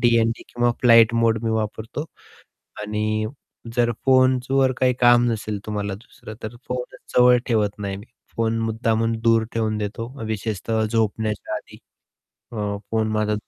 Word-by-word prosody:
DND 115 -1 +2
किंवा 120 0 +1
flight 115 -1 +6
मोड 115 -1 +3
मी 115 - +1
वापरतो. 110 +5 -3 0.8
आणि 110 +1 -1 0.5
जर 120 -1 +3 0.2
फोनवर 130 0 +3
काही 130 -1 +3
काम 120 0 +6
नसेल 110 -2 -3
तुम्हाला 105 -2 -3
दुसरं 110 +1 -12
तर 110 +2 -6
फोनच 125 0 -6
जवळ 125 0 +7
ठेवत 105 -4 0
नाही 100 -1 -4
मी. 100 +3 -11 0.3
फोन 115 0 0
मुद्दामहून 115 0 0
दूर 115 -1 +4
ठेवून 110 -1 -1
देतो 105 +2 -4 0.2
विशेषतः 110 0 -2
झोपण्याच्या 110 -1 -1
आधी. - - -10 0.8
अ, 105 -3 -3
फोन 110 -1 +1
माझा 105 0 0
115 Hz, 140 wpm, -22 LUFS, 110-120 Hz, 0.8 s, जवळ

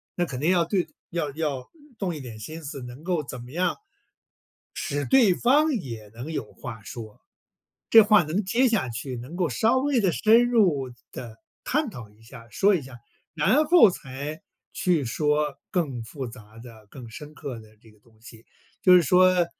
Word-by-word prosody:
那 175 - 0
肯 130 -6 -6
定 155 +6 +2
要 175 -2 +3
对 180 +1 0 0.2
要 160 -4 -2
要 140 -4 -3 0.3
动 185 -5 -2
一 150 - -7
点 115 -4 -9
心 160 +9 -8
思 140 -2 -7
能 125 +4 -10
够 175 -3 -1
怎 130 -3 -8
么 125 - -12
样 175 +5 0 1.0
使 145 -2 -3
对 240 -9 +5
方 295 - +3
也 115 - -5
能 125 +7 -7
有 120 -9 -5
话 110 0 -9
说， 110 -1 -10 0.7
这 225 - +9
话 210 -1 +5
能 170 +7 -2
接 245 +7 +2
下 195 - 0
去， 125 +3 -5
能 125 +7 -9
够 175 -2 0
稍 220 - +2
微 275 0 +1
地 190 -5 +2
深 230 +6 +4
入 170 - +2 0.2
地 115 -3 -9 0.3
探 300 +1 0
讨 120 - -10
一 105 +2 -24
下， 115 0 -13
说 200 - +3
一 165 - -1
下。 130 -1 -11 0.4
然 250 - +3
后 335 -4 +7
才 150 -1 -6 0.3
去 170 -6 +1
说 150 +3 0
更 140 -10 -2
复 130 +4 -7
杂 110 -2 -14
的、 115 -3 -13
更 125 -4 -10
深 150 +6 -10
刻 140 -6 -7
的 110 0 -18
这 110 - -19
个 105 - -24
东 110 0 -26
西， 115 0 -14 0.4
就 185 - +7
是 180 - +7
说， 180 +2 +4
150 Hz, 200 characters per minute, -25 LUFS, 120-185 Hz, 1.0 s, 这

